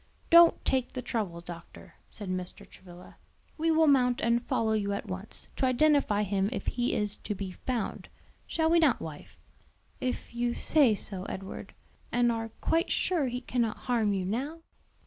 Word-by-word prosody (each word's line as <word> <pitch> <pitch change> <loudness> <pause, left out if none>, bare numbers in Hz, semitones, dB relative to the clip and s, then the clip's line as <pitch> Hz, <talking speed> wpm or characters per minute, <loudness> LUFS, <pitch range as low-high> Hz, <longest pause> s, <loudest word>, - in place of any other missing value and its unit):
"Don't 335 0 +7
take 260 -2 0
the 255 - -5
trouble, 200 -8 -3
doctor," 170 -1 -11 0.2
said 205 - -9
Mr. 185 -1 -5
Travilla; 180 -1 -14 0.4
"we 325 +1 0
will 320 0 +4
mount 250 -4 +4
and 235 +1 +2
follow 220 -2 0
you 200 -2 0
at 200 - -4
once, 190 +3 -7
to 265 - +2
identify 255 -5 +3
him 200 0 0
if - - -4
he 245 0 0
is 210 -1 -1
to 210 - -5
be 190 -1 -5
found. 235 +3 -4 0.4
Shall 320 0 +1
we 340 - +5
not, 300 -7 +3
wife?" 155 -2 -9 0.6
"If 250 -1 -3
you 240 0 -1
say 275 -8 +4
so, 195 -2 -5
Edward, 190 0 -7 0.4
and 240 0 +3
are 225 -1 -3
quite 330 +4 +1
sure 335 -7 +1
he 250 0 -3
cannot 235 -3 -1
harm 230 -5 0
you 190 -2 -1
now?" 275 - -3
235 Hz, 170 wpm, -29 LUFS, 200-265 Hz, 0.6 s, Don't